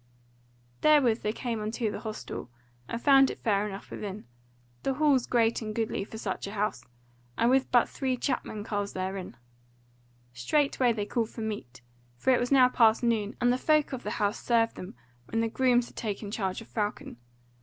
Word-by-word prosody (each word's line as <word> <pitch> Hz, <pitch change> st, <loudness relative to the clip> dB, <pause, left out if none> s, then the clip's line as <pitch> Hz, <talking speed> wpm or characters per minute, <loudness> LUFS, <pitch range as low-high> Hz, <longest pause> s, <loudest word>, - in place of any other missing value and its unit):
Therewithal 275 Hz, -7 st, +4 dB
they 210 Hz, -, 0 dB
came 230 Hz, -1 st, -3 dB
unto 220 Hz, +1 st, -2 dB
the -, -, -5 dB
hostel, 215 Hz, -, -6 dB, 0.4 s
and 230 Hz, -, -4 dB
found 270 Hz, +1 st, +6 dB
it -, -, -5 dB
fair 205 Hz, -1 st, +1 dB
enough 195 Hz, 0 st, -9 dB
within, 205 Hz, 0 st, -6 dB, 0.6 s
the 270 Hz, -, -1 dB
hall 290 Hz, -2 st, +4 dB
great 230 Hz, -1 st, +2 dB
and 215 Hz, -1 st, -5 dB
goodly 225 Hz, -3 st, -1 dB
for 220 Hz, -, -9 dB
such 200 Hz, -3 st, -4 dB
a 200 Hz, -, -7 dB
house, 210 Hz, +1 st, -2 dB, 0.5 s
and 235 Hz, +2 st, +3 dB
with 265 Hz, 0 st, +3 dB
but 245 Hz, -1 st, +5 dB
three 260 Hz, -2 st, -2 dB
chapmen 215 Hz, -5 st, -2 dB
carles 205 Hz, -1 st, -3 dB
therein. 185 Hz, -7 st, -4 dB, 1.0 s
Straightway 250 Hz, -, +2 dB
they 210 Hz, -3 st, -2 dB
called 225 Hz, +1 st, -1 dB
for 230 Hz, -, -8 dB
meat, 205 Hz, -, -5 dB, 0.4 s
for 195 Hz, -, +2 dB
it 250 Hz, -, +4 dB
was 245 Hz, +2 st, -2 dB
now 260 Hz, -2 st, +7 dB
past 230 Hz, -2 st, +4 dB
noon, 220 Hz, -3 st, 0 dB
and 245 Hz, 0 st, +3 dB
the 250 Hz, -, -1 dB
folk 305 Hz, -1 st, +2 dB
of 255 Hz, -, -4 dB
the 210 Hz, -, -4 dB
house 205 Hz, 0 st, -1 dB
served 230 Hz, -1 st, +2 dB
them 180 Hz, -, -8 dB, 0.3 s
when 225 Hz, -, -1 dB
the 230 Hz, -, +1 dB
grooms 245 Hz, +1 st, +2 dB
had -, -, -15 dB
taken 205 Hz, -2 st, -4 dB
charge 195 Hz, -2 st, -2 dB
of 225 Hz, -, -12 dB
Falcon. 210 Hz, -, -3 dB
225 Hz, 185 wpm, -28 LUFS, 205-250 Hz, 1.0 s, now